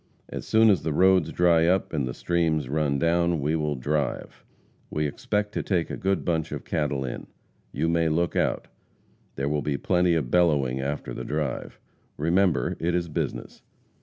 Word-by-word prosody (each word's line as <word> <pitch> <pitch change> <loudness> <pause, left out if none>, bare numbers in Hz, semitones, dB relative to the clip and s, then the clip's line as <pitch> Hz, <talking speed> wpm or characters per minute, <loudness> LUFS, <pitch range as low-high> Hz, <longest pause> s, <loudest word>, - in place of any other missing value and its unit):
As - - -6
soon 110 0 +5
as 95 - +2
the 80 - -2
roads 95 0 +4
dry 85 -2 +3
up, 95 0 +1
and 70 -5 -1
the - - -4
streams 80 -5 0
run 70 0 0
down, 85 +2 +1
we 75 +3 0
will 75 -2 -1
drive. 70 +1 -3 0.5
We 75 0 -1
expect 105 +8 -2
to - - -2
take 90 -4 -1
a - - -3
good 95 +1 -1
bunch 80 -3 -1
of - - -6
cattle 70 -3 -1
in. 60 - -6 0.4
You 80 - -1
may 85 -1 +2
look 85 +1 0
out. - - 0 0.7
There 70 +1 -2
will 75 0 0
be 70 -1 -1
plenty 90 0 +2
of 70 -7 -2
bellowing 70 -7 +2
after 70 -3 -4
the - - -5
drive. 75 -2 -3 0.4
Remember, 85 -4 +1
it 85 +1 0
is 85 -1 -1
business. 75 - -4
80 Hz, 180 wpm, -26 LUFS, 75-85 Hz, 0.7 s, soon